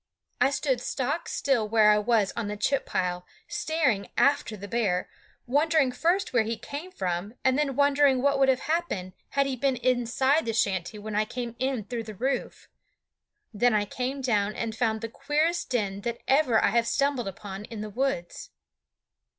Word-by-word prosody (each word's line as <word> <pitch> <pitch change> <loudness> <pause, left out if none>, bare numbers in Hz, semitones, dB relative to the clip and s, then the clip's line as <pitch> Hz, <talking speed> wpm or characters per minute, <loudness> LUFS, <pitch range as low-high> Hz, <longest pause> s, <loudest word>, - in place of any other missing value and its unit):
I - - +5
stood 270 -3 0
stock 275 +6 -2
still 235 -6 0
where 215 -1 +5
I 210 - +4
was 215 -2 +2
on 230 -3 -2
the 210 0 -4
chip 265 +6 0
pile, 180 -1 -1 0.2
staring 290 -11 0
after 280 -6 +2
the 205 +1 -8
bear, 200 -5 0 0.4
wondering 290 +1 +2
first 350 +7 0
where 240 - +4
he 225 +1 -2
came 300 +6 -7
from, 185 - -3
and 260 -1 +4
then 280 -2 0
wondering 285 -1 +4
what 280 +1 +2
would 270 -1 +4
have 260 -1 +2
happened 305 - -2 0.2
had 275 0 +1
he 270 -1 -2
been 270 +1 +1
inside 255 +4 +1
the 225 - 0
shanty 195 -1 0
when 210 +1 -6
I 210 +1 +2
came 240 0 -5
in 260 -3 -1
through 230 +2 -5
the 215 -1 -8
roof. 260 +5 -3 0.9
Then 240 +2 +3
I 205 -1 +2
came 255 +6 -3
down 215 -5 +1
and 225 -1 -3
found 220 -2 0
the 230 - -3
queerest 300 +8 -1
den 205 -5 -1
that 235 +2 -4
ever 265 -5 +4
I - - +3
have 235 +2 +2
stumbled 275 -5 0
upon 195 +1 -7
in 225 -2 -7
the 215 - -5
woods. 245 -7 -2
245 Hz, 185 wpm, -27 LUFS, 210-275 Hz, 0.9 s, I